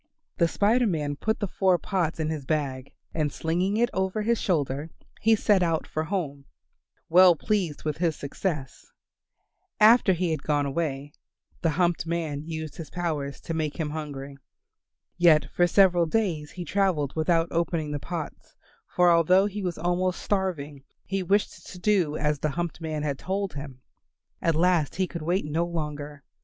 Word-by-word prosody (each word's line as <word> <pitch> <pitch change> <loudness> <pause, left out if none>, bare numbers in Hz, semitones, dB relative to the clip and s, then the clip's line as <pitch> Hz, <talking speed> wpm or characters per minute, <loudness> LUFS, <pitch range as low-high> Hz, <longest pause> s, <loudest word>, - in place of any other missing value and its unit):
The 170 - +4
Spider 225 +7 +2
Man 150 -6 -1
put 220 +9 -1
the 205 - -1
four 185 -1 +2
pots 175 -4 -2
in 155 -1 -1
his 155 -3 -4
bag 135 -3 -2 0.2
and 150 -3 0
slinging 180 +8 -1
it 240 +1 +2
over 190 +3 -1
his 230 +1 +1
shoulder 145 -3 -1 0.3
he 225 +1 +5
set 205 -2 +3
out 165 -2 +1
for 155 0 -3
his - - -12
home, 145 -8 -3 0.6
well 180 +1 +7
pleased 165 +1 -1
with 150 -2 -2
his 165 -3 +1
success. 145 -1 -4 0.9
After 215 -2 +6
he 175 -1 -1
had 155 -3 -2
gone 145 -1 0
away, 145 -1 -3 0.5
the 165 - +2
humped 175 -2 +1
man 160 -4 -2
used 160 -1 -6
his 160 -4 -7
power 155 -5 -2
to 165 - -7
make 155 0 -2
him 150 -2 -2
hungry. 140 -3 -6 0.8
Yet 170 -3 +5
for 175 - +3
several 175 -2 +4
days 160 -6 -1
he 180 -1 -7
travelled 180 -8 0
without 165 +1 +2
opening 165 -2 -1
the 145 - -2
pots, 165 0 -7 0.3
for 180 -1 +4
although 180 +3 +5
he 205 0 -4
was 180 -3 -3
almost 180 +2 0
starving 155 -8 -2 0.2
he 195 +1 -2
wished 200 +3 0
to 185 - -9
do 180 -5 +1
as 150 -1 0
the 155 - 0
humped 170 +2 -4
man 155 -2 -3
had 140 -2 -2
told 195 0 -2
him. 140 -3 -8 0.6
At 165 -2 +1
last 170 -3 +2
he 190 - +1
could 170 -2 -7
wait 175 +2 0
no 155 +3 0
longer. 150 -3 -5
165 Hz, 170 wpm, -26 LUFS, 150-185 Hz, 0.9 s, well